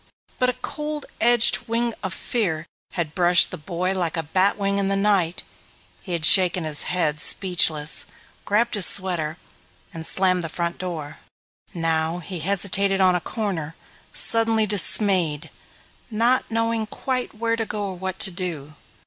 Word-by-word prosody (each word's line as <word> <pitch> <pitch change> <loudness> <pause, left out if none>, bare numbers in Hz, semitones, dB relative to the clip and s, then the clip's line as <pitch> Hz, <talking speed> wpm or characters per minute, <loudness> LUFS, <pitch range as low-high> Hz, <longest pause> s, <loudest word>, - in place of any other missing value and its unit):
But 250 - +2
a - - -1
cold 300 -1 -4 0.2
edged 240 +1 +5
wing 230 +1 -1
of 190 - -4
fear 180 -9 -3 0.3
had 165 -4 -3
brushed 175 -1 +4
the - - -6
boy 180 +4 -3
like 175 -3 -3
a 165 - -2
bat 185 +6 +1
wing 200 -1 -1
in 195 - -1
the 195 - 0
night. 195 -4 0 0.6
He 180 - -7
had 165 -2 +1
shaken 180 0 +6
his 155 -1 0
head, 155 -4 -1
speechless, 165 -5 +2 0.4
grabbed 230 +4 0
his 205 -4 +6
sweater, 175 -5 +3 0.6
and 165 -2 -8
slammed 185 +1 +2
the 165 - -5
front 170 +1 -4
door. 160 -5 -6 0.6
Now 165 0 -1
he 180 0 -6
hesitated 195 +2 +1
on 185 -1 +4
a 180 - -1
corner, 165 -7 -4 0.4
suddenly 225 -1 +1
dismayed, 190 -6 +1 0.6
not 235 +3 +1
knowing 230 -1 -2
quite 255 +2 -4
where 230 +1 -1
to 225 -1 -4
go 210 -1 -4
or 190 - -7
what 190 +1 -5
to 190 - +1
do. 170 -5 -5
185 Hz, 155 wpm, -22 LUFS, 165-215 Hz, 0.6 s, shaken